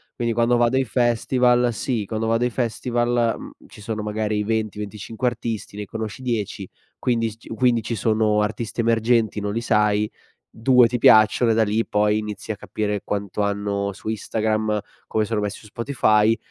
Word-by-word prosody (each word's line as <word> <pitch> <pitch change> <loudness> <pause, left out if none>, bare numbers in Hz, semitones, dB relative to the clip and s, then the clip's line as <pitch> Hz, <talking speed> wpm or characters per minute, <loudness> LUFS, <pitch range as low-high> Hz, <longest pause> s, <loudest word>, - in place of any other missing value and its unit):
quindi 120 -1 -1
quando 120 +1 +2
vado 120 +2 +2
ai 135 - +2
festival 120 +1 +2
sì, 115 0 -2
quando 110 +2 -3
vado 115 +2 +2
ai - - +1
festival, 120 0 0
mhmm, - - -9 0.2
ci 105 - -14
sono 110 0 -4
magari 105 0 -2
i 105 - 0
20-25 110 +1 -3
artisti, 115 -4 -4
ne 105 - -4
conosci 110 +3 -6
10, 105 -5 -3 0.3
quindi 115 -2 0
s - - -13
ci - - -16
quindi 120 -1 +1
ci 115 - -3
sono 110 0 +2
artisti 110 +2 -3
emergenti, 115 -1 +2
non 100 0 -2
li 115 - -1
sai, 105 -2 +2 0.4
2 125 +1 +5
ti 125 - -2
piacciono, 110 +2 +5
e - - +3
da 115 - +3
lì 110 +2 0
poi 105 0 +2
inizi 105 0 -5
a 105 - -5
capire 105 -1 -3
quanto 100 0 -3
hanno 100 -1 -1
su 110 - -7
Instagram, 110 0 -1 0.3
come 110 - 0
sono 105 0 -1
messi 105 -1 -3
su 105 - -15
Spotify, 115 -2 +2
110 Hz, 180 wpm, -22 LUFS, 105-120 Hz, 0.4 s, 2